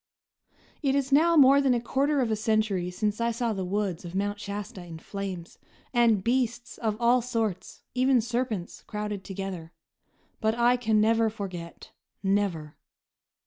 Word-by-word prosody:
It 275 -2 +1
is 275 -1 0
now 330 +4 +5
more 280 0 +7
than 265 -3 +3
a - - +1
quarter 275 +4 +1
of 235 -3 0
a - - +2
century 215 -4 0
since 210 +4 -2
I 235 - +2
saw 235 0 -1
the 190 -2 -3
woods 190 -1 -2
of 175 +1 -8
Mount 205 +1 -1
Shasta 200 -2 -6
in 170 -2 -9
flames, 185 0 -7 0.3
and 230 -5 +3
beasts 240 0 -1
of 215 -2 -1
all 240 +1 +4
sorts, 225 -6 -3
even 255 0 +3
serpents, 235 -5 -3
crowded 210 -2 -4
together; 190 -4 -6 0.7
but 220 +1 +1
I 240 +1 +4
can 225 -3 +1
never 225 +1 +3
forget, 185 -6 -8 0.3
never! 190 -6 0
215 Hz, 155 wpm, -27 LUFS, 195-240 Hz, 0.7 s, more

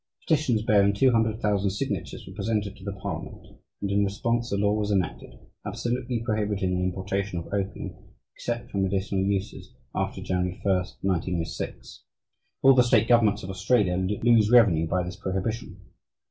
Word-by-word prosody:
Petitions 135 -9 +2
bearing 100 -2 +4
200,000 110 -4 +2
signatures 100 - -4
were 95 - -10
presented 105 0 -2
to 95 - -15
the 100 - -3
parliament, 95 -1 -7 0.3
and 100 - -1
in 100 0 +3
response 115 +4 -1
a 100 - +1
law 100 +1 +2
was 105 -1 -1
enacted 95 -5 -2 0.3
absolutely 120 -1 -2
prohibiting 105 -4 0
the 90 - 0
importation 95 +1 -2
of 85 +3 -6
opium, 100 0 -3 0.4
except 120 0 -4
for 100 - -2
medicinal 95 0 0
uses, 100 -1 -3 0.2
after - - -2
January 90 0 -2
1, 100 -2 +3 0.3
1906. 90 -2 -3 0.6
All 135 - +8
the 130 - +6
state 120 -2 +3
governments 110 -4 +4
of 95 - -5
Australia 95 -1 +2 0.3
lose 115 -3 +5
revenue 100 -10 +5
by 90 +2 0
this 90 +1 -6
prohibition. 95 +5 -3
100 Hz, 150 wpm, -26 LUFS, 95-115 Hz, 0.6 s, All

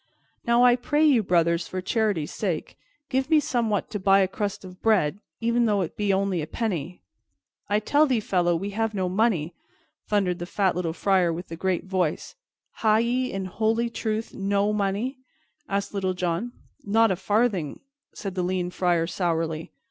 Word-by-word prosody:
"Now, 235 +1 +5
I 245 -1 +7
pray 295 +5 +1
you, 270 -7 +5
brothers, 170 -3 +1
for 185 - -4
charity's 195 -5 -1
sake, 180 -7 -3 0.4
give 265 +2 0
me 315 -2 +6
somewhat 230 -7 -1
to 210 - -3
buy 195 +1 +5
a 190 - +3
crust 200 0 -4
of 185 0 -12
bread, 200 -6 +2 0.2
e'en 235 +1 +2
though 205 -3 +2
it 170 - -4
be 205 -1 0
only 190 -3 +1
a 150 - -5
penny." 180 -5 -3 0.7
"I 205 +1 +3
tell 290 +8 +3
thee, 255 -4 +2
fellow, 175 -4 +1
we 195 +5 -3
have 220 +1 -1
no 185 -2 0
money," 185 -4 +1 0.6
thundered 190 -4 +1
the 175 - -5
fat 190 -1 +1
little 175 -2 -1
Friar 185 -1 +2
with 170 +3 -6
the 165 - -5
great 185 +1 -1
voice. 185 -4 -1 0.4
"Ha' 215 -1 +3
ye, 245 +3 0
in 195 -1 -3
holy 225 +5 0
truth, 220 -1 -3
no 200 +1 0
money?" 210 +6 -1 0.5
asked 200 +1 -2
Little 190 -2 -1
John. 180 +7 -2 0.3
"Not 225 +1 +3
a - - +1
farthing," 205 -4 0 0.4
said 195 -2 -5
the 185 - -1
lean 180 0 -1
Friar 175 -2 +1
sourly. 165 -2 -2
195 Hz, 180 wpm, -25 LUFS, 180-225 Hz, 0.7 s, I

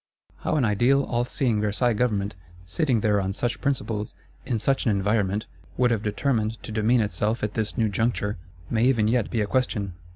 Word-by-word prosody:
How - - -1
an 140 -5 +3
ideal, 120 +7 +3
all 120 -1 -1
seeing 120 -4 0
Versailles 110 +4 +1
Government, 105 -4 0 0.3
sitting 115 - +1
there 105 -1 +2
on 95 0 -2
such 120 +3 -2
principles, 115 -7 -2 0.3
in 120 - 0
such 135 +5 +1
an - - +3
environment, 105 0 +1 0.3
would 125 -1 +3
have 115 -3 +1
determined 110 +1 0
to - - -7
demean 110 +3 +3
itself 105 +3 -1
at 105 0 -1
this 110 +1 -2
new 115 -2 +3
juncture, 105 -1 -1 0.3
may 115 +3 +1
even 120 -5 +3
yet 115 -1 +1
be 115 - 0
a - - +1
question. 105 -4 -1
110 Hz, 190 wpm, -25 LUFS, 105-120 Hz, 0.3 s, an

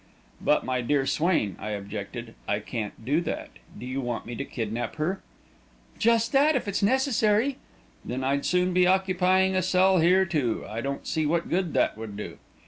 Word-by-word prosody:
"But, - - +2
my 130 -1 0
dear 135 +2 +1
Swain," 145 - +1
I 105 - -4
objected, 105 +4 -7
"I 105 - +1
can't 110 0 -6
do 145 +6 +2
that. - - -4 0.3
Do - - -8
you 130 +2 -3
want 120 -2 -3
me 120 - -6
to 140 - -3
kidnap 115 -2 -4
her?" 170 +5 -2 0.8
"Just 230 0 +3
that 290 +3 +4
if 255 - -1
it's 200 - -1
necessary." 250 +1 +2 0.4
"Then 130 +2 -4
I'd 140 +2 0
soon 180 0 +1
be 180 0 +4
occupying 190 0 +3
a 185 - +3
cell 185 +1 +3
here, 185 +3 +4
too. 145 -10 -1
I 110 +2 -4
don't 140 +2 -4
see 160 -2 0
what 170 +2 -1
good 180 -2 0
that - - +1
would 110 -2 -7
do." 105 - -7
160 Hz, 185 wpm, -26 LUFS, 120-190 Hz, 0.8 s, that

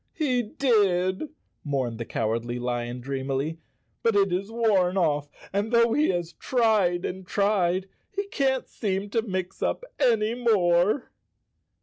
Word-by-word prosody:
"He 255 -6 +1
did," 205 - +1 0.3
mourned 130 -6 -2
the 115 - -3
Cowardly 115 +2 -2
Lion 120 0 -3
dreamily, 135 +4 -3 0.4
"but 230 -2 +2
it 195 -2 +3
has 195 +4 -2
worn 200 -5 +2
off 150 -5 +1 0.2
and, 205 +3 0
though 235 -1 +4
he 300 +1 +3
has 175 -2 -2
tried 215 -8 +1
and 190 +1 -4
tried, 190 -2 +1 0.2
he 400 0 -3
can't 265 -5 0
seem 200 -1 -3
to 225 - +2
mix 185 -4 -4
up - - -1
any 225 -5 +3
more." 210 -2 +2
190 Hz, 135 wpm, -26 LUFS, 165-225 Hz, 0.4 s, though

